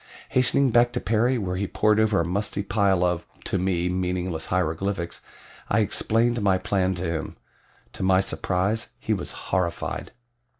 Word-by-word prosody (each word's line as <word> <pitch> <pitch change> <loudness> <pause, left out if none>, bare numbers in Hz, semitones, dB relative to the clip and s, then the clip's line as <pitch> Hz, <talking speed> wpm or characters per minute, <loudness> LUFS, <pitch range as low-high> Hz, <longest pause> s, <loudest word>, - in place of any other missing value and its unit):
Hastening 130 +1 +3
back 120 +1 +4
to 125 - -1
Perry 120 +3 +1
where 90 -4 -2
he 100 +1 -1
pored 105 +2 +2
over 110 -2 +3
a 85 - +1
musty 100 +3 -1
pile 100 -3 +2
of, 90 -1 0 0.2
to 95 - -1
me, 90 -1 0
meaningless 90 -2 -2
hieroglyphics, 90 +1 -1 0.5
I - - +3
explained 115 +1 +1
my 95 -2 +3
plan 95 -1 0
to 90 - -4
him. 80 -2 -3 0.6
To - - -8
my 95 0 +4
surprise 95 +2 -1
he - - -1
was - - -3
horrified. 90 -2 -2
95 Hz, 160 wpm, -25 LUFS, 90-110 Hz, 0.6 s, back